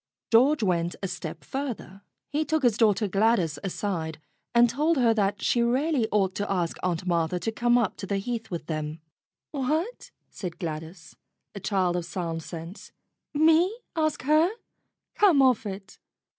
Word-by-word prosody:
George 260 Hz, +4 st, +5 dB
went 175 Hz, -3 st, 0 dB
a -, -, 0 dB
step 180 Hz, -2 st, -6 dB
further. 245 Hz, -8 st, -5 dB, 0.3 s
He 300 Hz, +2 st, +1 dB
took 315 Hz, -1 st, 0 dB
his 240 Hz, -4 st, +4 dB
daughter 215 Hz, -1 st, +3 dB
Gladys 195 Hz, -6 st, +2 dB
aside 170 Hz, -5 st, -3 dB, 0.3 s
and 240 Hz, 0 st, +6 dB
told 300 Hz, +7 st, +1 dB
her 235 Hz, -3 st, +4 dB
that 205 Hz, -2 st, 0 dB
she 240 Hz, -, +2 dB
really 255 Hz, +1 st, +1 dB
ought 195 Hz, -3 st, +2 dB
to 205 Hz, 0 st, -2 dB
ask 175 Hz, -3 st, -1 dB
Aunt 180 Hz, -1 st, -1 dB
Martha 170 Hz, 0 st, 0 dB
to 225 Hz, -, -2 dB
come 240 Hz, +2 st, +2 dB
up 230 Hz, -5 st, 0 dB
to 195 Hz, -, -6 dB
the 200 Hz, -, 0 dB
Heath 225 Hz, +2 st, -4 dB
with 170 Hz, -5 st, -5 dB
them. 155 Hz, 0 st, -4 dB, 0.5 s
"What?" 310 Hz, -, -2 dB, 0.2 s
said 180 Hz, -4 st, -6 dB
Gladys, 160 Hz, 0 st, -6 dB, 0.4 s
a 200 Hz, -, -6 dB
child 185 Hz, -3 st, 0 dB
of 175 Hz, -1 st, -2 dB
sound 170 Hz, -2 st, -4 dB
sense. 165 Hz, +4 st, -9 dB, 0.4 s
"Me 325 Hz, +7 st, +4 dB, 0.2 s
ask 310 Hz, -5 st, 0 dB
her? 310 Hz, +5 st, +4 dB, 0.7 s
Come 380 Hz, -9 st, +5 dB
off 255 Hz, -5 st, +4 dB
it!" 195 Hz, 0 st, -8 dB
205 Hz, 160 wpm, -26 LUFS, 175-260 Hz, 0.7 s, and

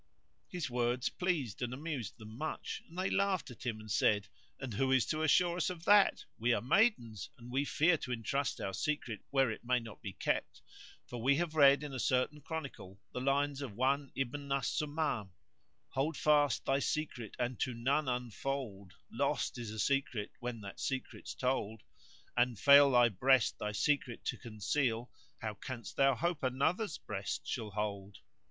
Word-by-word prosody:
His 180 Hz, -6 st, -3 dB
words 120 Hz, 0 st, 0 dB
pleased 160 Hz, -, -2 dB
and 125 Hz, 0 st, -2 dB
amused 140 Hz, -, -5 dB
them 110 Hz, -1 st, -10 dB
much; 155 Hz, +6 st, -4 dB
and 170 Hz, -, -13 dB
they 190 Hz, +1 st, 0 dB
laughed 200 Hz, -7 st, +1 dB
at 120 Hz, +1 st, -8 dB
him 110 Hz, -2 st, -2 dB
and 110 Hz, -1 st, -9 dB
said, 105 Hz, 0 st, +2 dB, 0.3 s
"And 130 Hz, -4 st, -5 dB
who 130 Hz, +6 st, +1 dB
is 130 Hz, -3 st, +4 dB
to 155 Hz, -, -1 dB
assure 170 Hz, +3 st, +3 dB
us 180 Hz, -, +1 dB
of 170 Hz, -2 st, -7 dB
that? 205 Hz, -1 st, +5 dB
We 120 Hz, +2 st, +3 dB
are -, -, 0 dB
maidens 120 Hz, -, +2 dB
and 120 Hz, -1 st, -11 dB
we 135 Hz, +3 st, +1 dB
fear 165 Hz, +4 st, +3 dB
to 125 Hz, -, -6 dB
entrust 125 Hz, +4 st, -1 dB
our 95 Hz, -, -3 dB
secret 125 Hz, -5 st, -2 dB
where 135 Hz, -4 st, +3 dB
it 110 Hz, -, -7 dB
may 125 Hz, +1 st, +2 dB
not 115 Hz, -2 st, -10 dB
be 100 Hz, -4 st, -6 dB
kept, -, -, -2 dB, 0.4 s
for 120 Hz, -2 st, -7 dB
we 135 Hz, +4 st, +4 dB
have 170 Hz, 0 st, -1 dB
read 140 Hz, -1 st, +6 dB
in 145 Hz, -2 st, -6 dB
a 130 Hz, -, -4 dB
certain 130 Hz, +5 st, +1 dB
chronicle 140 Hz, -, -7 dB
the 125 Hz, -, -3 dB
lines 140 Hz, +1 st, +1 dB
of 130 Hz, -7 st, -5 dB
one 135 Hz, +5 st, +1 dB
Ibn 140 Hz, +2 st, -3 dB
al 140 Hz, 0 st, +2 dB
Sumam:— 145 Hz, -, -1 dB, 0.6 s
Hold 145 Hz, +3 st, -1 dB
fast 145 Hz, -3 st, +3 dB
thy 135 Hz, 0 st, +2 dB
secret 140 Hz, -7 st, -3 dB
and 125 Hz, 0 st, -2 dB
to 125 Hz, -2 st, -1 dB
none 135 Hz, +5 st, +1 dB
unfold 125 Hz, -5 st, -3 dB
* -, -, -38 dB
Lost -, -, 0 dB
is 115 Hz, -3 st, -5 dB
a 110 Hz, -, -7 dB
secret 125 Hz, -2 st, 0 dB
when 120 Hz, -2 st, -5 dB
that 100 Hz, -1 st, -9 dB
secret's 135 Hz, -1 st, -4 dB
told 115 Hz, -4 st, -1 dB, 0.5 s
An 120 Hz, 0 st, +2 dB
fail 140 Hz, +5 st, +8 dB
thy 120 Hz, -2 st, +5 dB
breast 125 Hz, +4 st, +3 dB
thy 105 Hz, -, -2 dB
secret 125 Hz, +3 st, 0 dB
to 120 Hz, -, -2 dB
conceal 120 Hz, +2 st, -1 dB
* -, -, -34 dB
How 110 Hz, -1 st, -2 dB
canst 115 Hz, +1 st, -7 dB
thou 135 Hz, -1 st, +4 dB
hope 170 Hz, +5 st, -1 dB
another's 155 Hz, -, 0 dB
breast 100 Hz, -6 st, -4 dB
shall 115 Hz, -4 st, -3 dB
hold? 100 Hz, -1 st, -4 dB
130 Hz, 185 wpm, -34 LUFS, 115-145 Hz, 0.6 s, fail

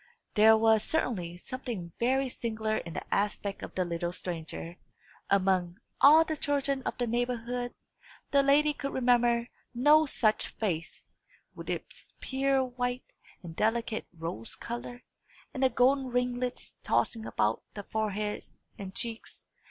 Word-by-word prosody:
There 220 Hz, +1 st, +7 dB
was 220 Hz, -1 st, +4 dB
certainly 185 Hz, -, -1 dB
something 230 Hz, -6 st, -6 dB
very 265 Hz, +3 st, +2 dB
singular 220 Hz, -3 st, -2 dB
in 170 Hz, -1 st, -6 dB
the -, -, -4 dB
aspect 205 Hz, 0 st, -1 dB
of -, -, -8 dB
the 185 Hz, -, +1 dB
little 170 Hz, 0 st, -2 dB
stranger. 170 Hz, -1 st, -6 dB, 0.5 s
Among 185 Hz, -2 st, +2 dB, 0.2 s
all 310 Hz, +3 st, +8 dB
the 315 Hz, -, -2 dB
children 280 Hz, -2 st, 0 dB
of -, -, -3 dB
the 245 Hz, -, 0 dB
neighbourhood, 245 Hz, +1 st, -2 dB, 0.6 s
the 280 Hz, -, +5 dB
lady 295 Hz, +2 st, +4 dB
could 275 Hz, -1 st, -5 dB
remember 240 Hz, -2 st, +3 dB, 0.3 s
no 300 Hz, +5 st, +5 dB
such 215 Hz, -5 st, +2 dB
face, 175 Hz, -7 st, -3 dB, 0.5 s
with -, -, -9 dB
its -, -, -6 dB
pure 270 Hz, 0 st, +1 dB
white, 245 Hz, 0 st, -3 dB, 0.4 s
and 165 Hz, -2 st, -8 dB
delicate 225 Hz, +1 st, 0 dB
rose 160 Hz, -9 st, -5 dB
colour, 240 Hz, +1 st, -7 dB, 0.5 s
and 270 Hz, -, -4 dB
the 265 Hz, -, +5 dB
golden 265 Hz, +2 st, +3 dB
ringlets 250 Hz, 0 st, -2 dB
tossing 225 Hz, -2 st, 0 dB
about 105 Hz, +1 st, 0 dB
the 205 Hz, -, -5 dB
forehead 210 Hz, 0 st, -2 dB, 0.4 s
and 190 Hz, -1 st, -7 dB
cheeks. 230 Hz, -1 st, -4 dB
235 Hz, 135 wpm, -30 LUFS, 200-255 Hz, 0.6 s, all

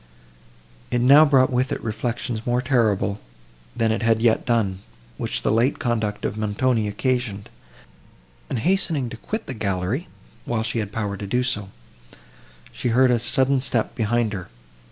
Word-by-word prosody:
It 120 Hz, -, 0 dB
now 140 Hz, +5 st, +7 dB
brought 135 Hz, -3 st, +4 dB
with 125 Hz, +1 st, 0 dB
it -, -, -2 dB
reflections 115 Hz, +1 st, -3 dB
more 120 Hz, 0 st, +2 dB
terrible, 110 Hz, -6 st, +1 dB, 0.6 s
than 115 Hz, -1 st, +1 dB
it 110 Hz, -, -1 dB
had 115 Hz, -1 st, +3 dB
yet 115 Hz, +1 st, +2 dB
done, 105 Hz, -6 st, +1 dB, 0.4 s
which -, -, -3 dB
the -, -, +2 dB
late 115 Hz, +6 st, +2 dB
conduct 110 Hz, -4 st, -2 dB
of 110 Hz, -, -3 dB
Montoni 110 Hz, +1 st, 0 dB
occasioned; 110 Hz, -1 st, -2 dB, 1.0 s
and, -, -, -2 dB
hastening 160 Hz, -3 st, +1 dB
to 115 Hz, -, -8 dB
quit 220 Hz, -, -5 dB
the 135 Hz, -, -5 dB
gallery, 100 Hz, -, -2 dB, 0.4 s
while 115 Hz, -2 st, -1 dB
she 115 Hz, +1 st, -2 dB
had 105 Hz, -2 st, -3 dB
power 105 Hz, -2 st, -3 dB
to 100 Hz, -, -6 dB
do 125 Hz, +5 st, +1 dB
so, 105 Hz, -6 st, -2 dB, 1.0 s
she -, -, -3 dB
heard 125 Hz, +2 st, +4 dB
a 120 Hz, -, +2 dB
sudden 130 Hz, +2 st, +2 dB
step 120 Hz, -4 st, 0 dB
behind 115 Hz, 0 st, 0 dB
her. 90 Hz, -3 st, -6 dB
115 Hz, 160 wpm, -23 LUFS, 105-125 Hz, 1.0 s, now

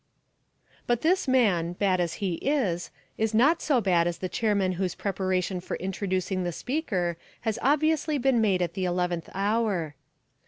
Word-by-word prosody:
But 240 Hz, -1 st, +1 dB
this 365 Hz, +1 st, +2 dB
man, 200 Hz, -10 st, +2 dB
bad 185 Hz, 0 st, +1 dB
as 170 Hz, -2 st, -1 dB
he 195 Hz, -4 st, -2 dB
is, 225 Hz, -, 0 dB, 0.3 s
is 220 Hz, 0 st, 0 dB
not 295 Hz, +9 st, +4 dB
so 280 Hz, -6 st, +2 dB
bad 175 Hz, -5 st, +2 dB
as 175 Hz, -, -2 dB
the 185 Hz, -, -3 dB
chairman 205 Hz, -4 st, +1 dB
whose 185 Hz, -1 st, -2 dB
preparation 185 Hz, -1 st, -1 dB
for -, -, -4 dB
introducing 190 Hz, 0 st, -2 dB
the 175 Hz, -, -1 dB
speaker 185 Hz, -, -2 dB, 0.2 s
has 220 Hz, -2 st, -2 dB
obviously 305 Hz, +2 st, +2 dB
been 260 Hz, -3 st, +2 dB
made 190 Hz, -4 st, +2 dB
at 170 Hz, -1 st, -3 dB
the 190 Hz, -, -2 dB
eleventh 175 Hz, -1 st, -1 dB
hour. 200 Hz, -6 st, 0 dB
195 Hz, 160 wpm, -27 LUFS, 180-240 Hz, 0.3 s, not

